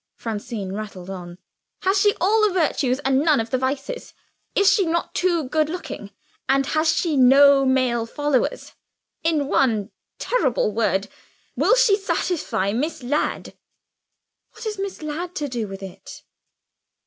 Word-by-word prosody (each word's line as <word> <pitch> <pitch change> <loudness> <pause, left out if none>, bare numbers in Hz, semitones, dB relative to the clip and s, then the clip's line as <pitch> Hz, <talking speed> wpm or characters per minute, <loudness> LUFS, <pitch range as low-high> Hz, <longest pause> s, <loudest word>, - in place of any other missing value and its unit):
Francine 215 -3 -5
rattled 195 -3 -7
on. 175 -2 -8 0.5
"Has 385 +1 +2
she 410 0 +4
all 415 +6 +3
the 425 -1 +3
virtues, 295 -7 +1
and 270 -1 +2
none 300 -2 +3
of 225 0 -3
the 255 - +2
vices? 275 - -4 0.4
Is 400 - +3
she 400 - +3
not 340 0 -1
too 350 -3 +1
good 305 +3 0
looking, 325 - -6 0.4
and 275 0 +3
has 315 +3 +2
she 330 -4 0
no 275 +1 +6
male 250 -3 +1
followers? 290 0 -1 0.5
In 315 -3 +1
one 225 -7 +1 0.3
terrible 265 - 0
word 200 -3 0 0.5
will - - +4
she - - +5
satisfy 275 - -1
Miss 285 +3 -2
Ladd?" 290 +5 -2 1.0
"What 455 - -11
has 425 -3 -4
Miss 390 -4 -5
Ladd 340 +4 -5
to 295 -4 -2
do 240 -5 -3
with 195 0 -8
it?" 190 -2 -10
280 Hz, 150 wpm, -22 LUFS, 230-345 Hz, 1.0 s, no